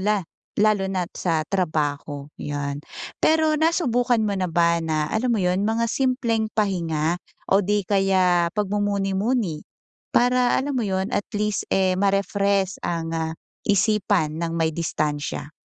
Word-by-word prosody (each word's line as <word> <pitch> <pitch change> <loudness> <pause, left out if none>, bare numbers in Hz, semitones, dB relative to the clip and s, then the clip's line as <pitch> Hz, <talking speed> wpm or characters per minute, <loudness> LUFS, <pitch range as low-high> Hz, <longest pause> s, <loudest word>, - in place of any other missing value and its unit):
la 205 -2 +1 0.4
lalo 210 -2 +3
na't 180 -2 -2
sa 165 -3 0
trabaho, 145 -5 -1
'yon. 145 0 -3 0.4
Pero 315 -1 +4
nasubukan 250 -7 +2
mo 210 -2 0
na 185 -1 -1
ba 170 0 +3
na, 155 -2 0
alam 240 +3 0
mo 220 - +1
'yon? 180 +2 +1
Mga 225 +2 +1
simpleng 240 -4 0
pahinga 170 -6 0 0.3
o 195 +1 +5
'di 205 0 +1
kaya 185 -3 +3
pagmumuni-muni? 205 -2 0 0.5
Para, 245 0 +3
alam 280 +1 -2
mo 240 - +1
'yon, 190 0 -1
at 205 - -1
least, 210 0 0
eh, 190 -1 +3
ma-refresh 200 0 +1
ang, 165 -1 -2
ah, 160 0 -2 0.4
isipan 195 -6 +2
ng 165 0 -2
may 160 -1 +1
distansiya. 150 -3 -2
195 Hz, 140 wpm, -23 LUFS, 165-215 Hz, 0.5 s, o